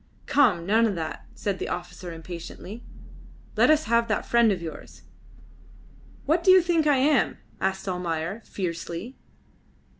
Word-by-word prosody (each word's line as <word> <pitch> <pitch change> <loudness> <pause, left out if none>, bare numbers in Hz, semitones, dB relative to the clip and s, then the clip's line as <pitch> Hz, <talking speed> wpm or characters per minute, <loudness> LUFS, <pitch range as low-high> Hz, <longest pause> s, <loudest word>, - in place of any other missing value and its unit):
"Come! 210 -13 +3
None 225 +4 +4
of 205 - -2
that," 160 -2 -5
said 200 -2 -3
the - - -3
officer 180 0 -6
impatiently. 175 +6 -8 0.7
"Let - - +4
us 310 0 +4
have 235 0 +2
that 215 - -1
friend 235 -2 +4
of 190 - -1
yours." 165 -2 -9 1.2
"What 325 +4 +2
do 385 - +3
you 370 -1 +8
think 335 -3 +2
I 290 -2 +4
am?" 280 +2 +2 0.2
asked 190 +1 -2
Almayer, 180 +2 -3
fiercely. 175 +5 -5
200 Hz, 145 wpm, -26 LUFS, 175-260 Hz, 1.2 s, you